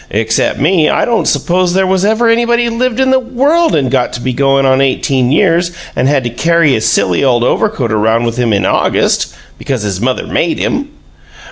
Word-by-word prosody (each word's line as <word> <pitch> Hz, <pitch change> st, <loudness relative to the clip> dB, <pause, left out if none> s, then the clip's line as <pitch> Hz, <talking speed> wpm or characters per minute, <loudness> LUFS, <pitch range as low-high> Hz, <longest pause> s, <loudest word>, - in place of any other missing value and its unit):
Except 110 Hz, +1 st, -1 dB
me, 160 Hz, +2 st, +2 dB
I -, -, +1 dB
don't 235 Hz, -1 st, 0 dB
suppose 180 Hz, 0 st, 0 dB
there 190 Hz, 0 st, +2 dB
was 185 Hz, 0 st, 0 dB
ever 220 Hz, +3 st, +1 dB
anybody 235 Hz, +1 st, +1 dB
lived 245 Hz, +1 st, -2 dB
in 265 Hz, 0 st, +2 dB
the 265 Hz, -, +3 dB
world 275 Hz, -, 0 dB
and 135 Hz, -4 st, 0 dB
got 130 Hz, -2 st, 0 dB
to -, -, -5 dB
be 130 Hz, +1 st, -3 dB
going 135 Hz, +1 st, +1 dB
on 130 Hz, 0 st, +2 dB
eighteen 130 Hz, -1 st, 0 dB
years 170 Hz, +1 st, +2 dB
old 170 Hz, -, -17 dB, 0.2 s
and 130 Hz, -, 0 dB
had 140 Hz, -2 st, +1 dB
to 120 Hz, -, -4 dB
carry 165 Hz, +2 st, +1 dB
his 110 Hz, -, 0 dB
silly 90 Hz, +7 st, 0 dB
old 120 Hz, -3 st, +2 dB
overcoat 140 Hz, -, -1 dB
around 110 Hz, +2 st, +1 dB
with 115 Hz, 0 st, -3 dB
him 120 Hz, -2 st, 0 dB
in 100 Hz, -2 st, 0 dB
August -, -, 0 dB, 0.2 s
because 130 Hz, -6 st, -3 dB
his 100 Hz, -2 st, -4 dB
mother 130 Hz, +1 st, -1 dB
made 165 Hz, -1 st, -1 dB
him!" 280 Hz, +1 st, -2 dB
145 Hz, 210 wpm, -12 LUFS, -, 0.2 s, the